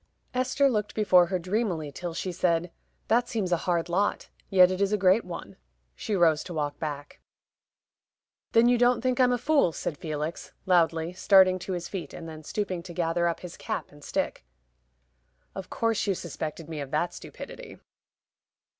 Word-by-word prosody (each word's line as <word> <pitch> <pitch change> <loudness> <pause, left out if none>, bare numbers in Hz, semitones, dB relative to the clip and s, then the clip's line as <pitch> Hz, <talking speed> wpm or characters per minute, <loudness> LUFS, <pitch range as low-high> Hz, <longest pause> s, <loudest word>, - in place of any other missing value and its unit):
Esther 255 +2 +2
looked 210 -5 -1
before 185 -5 +5
her 185 - 0
dreamily 180 -4 -2
till 175 +5 -5
she 185 - -3
said, 170 0 0 0.4
"That 235 +2 +2
seems 205 -6 -2
a 175 - +4
hard 170 -1 +1
lot; 190 +4 0 0.2
yet 185 -2 +6
it 185 +1 -2
is 200 0 +2
a 210 - +2
great 190 +3 +4
one." 175 -2 -8 0.4
She 210 - -3
rose 165 -4 +3
to 175 - -7
walk 145 -2 -2
back. 145 -2 -6 1.3
"Then 230 +1 +6
you 245 -1 +4
don't 245 0 +4
think 255 0 0
I'm 250 -1 +5
a 245 - +2
fool," 280 - +3
said 155 -1 -4
Felix, 155 -1 -4
loudly, 170 -2 +2
starting 185 0 +5
to 185 +1 -4
his 175 -1 -4
feet, 190 -4 -6
and 165 - -8
then 155 -1 -8
stooping 185 -1 -3
to 175 0 -10
gather 170 0 0
up 170 - -2
his 180 -2 -8
cap - - -4
and 145 0 -16
stick. - - -2 1.1
"Of 195 -1 -7
course 225 -3 0
you 195 - +2
suspected 160 -1 -6
me 160 -2 -5
of 140 - -6
that 155 +5 -1
stupidity." - - -10
180 Hz, 180 wpm, -27 LUFS, 165-205 Hz, 1.3 s, yet